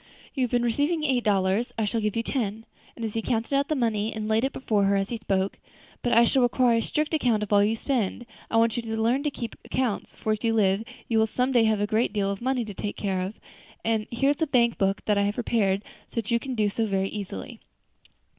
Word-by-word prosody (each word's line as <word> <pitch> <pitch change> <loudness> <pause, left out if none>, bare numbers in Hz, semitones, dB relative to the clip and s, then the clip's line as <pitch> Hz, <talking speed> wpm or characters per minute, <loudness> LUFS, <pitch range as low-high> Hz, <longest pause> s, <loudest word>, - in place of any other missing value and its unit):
You 265 - 0
have - - -5
been 240 0 +1
receiving 290 +7 +1
eight 260 -5 +1
dollars 200 +2 +1
I 220 - +1
shall 225 +2 -1
give 210 -1 -1
you 230 - 0
ten," 225 -4 -2 0.3
and 230 - -4
he 225 +1 -2
counted 230 +3 -1
out 280 +1 +2
the 310 - 0
money 225 -4 0
and 215 -1 -4
laid 220 +2 +2
it 270 - +1
before 215 -7 0
her 200 +1 +3
as 195 0 0
he 235 - -3
spoke; 195 -3 -1 0.4
"but 245 - 0
I 235 - +6
shall 260 +3 +3
require 245 -1 +3
a - - +2
strict 305 +6 -1
account 240 -8 +2
of 210 - -2
all 205 - +6
that 205 - +4
you 220 - 0
spend. 240 -2 -1 0.2
I 225 - +1
want 225 0 +3
you 240 - -1
to 225 -1 -4
learn 235 +5 +2
to 295 - 0
keep 240 -4 -6
accounts, 250 -6 -2
for 215 - -1
if 215 - -5
you 225 -1 +2
live, 200 -1 +2 0.2
you 225 -2 +2
will 220 - +3
some 250 +4 0
day 240 -3 +4
have 220 -1 +2
a - - +2
great 215 +1 +1
deal 200 -2 0
of 200 - -5
money 255 -1 0
to 210 - -7
take 205 +2 -5
care 190 -3 -1
of; 190 +4 -5 0.5
and 220 -1 0
here 270 +4 +2
is 290 - -4
a 320 - +2
blank 235 -4 +2
book 195 0 0
that 210 -1 +2
I - - +3
have 205 +1 0
prepared, 210 -5 +1 0.2
so - - -21
that 230 -1 -2
you 235 - +3
can 260 +1 -5
do 215 -2 +2
so 220 +2 -1
very 195 -1 0
easily. 195 - -6
225 Hz, 265 wpm, -26 LUFS, 205-245 Hz, 0.5 s, I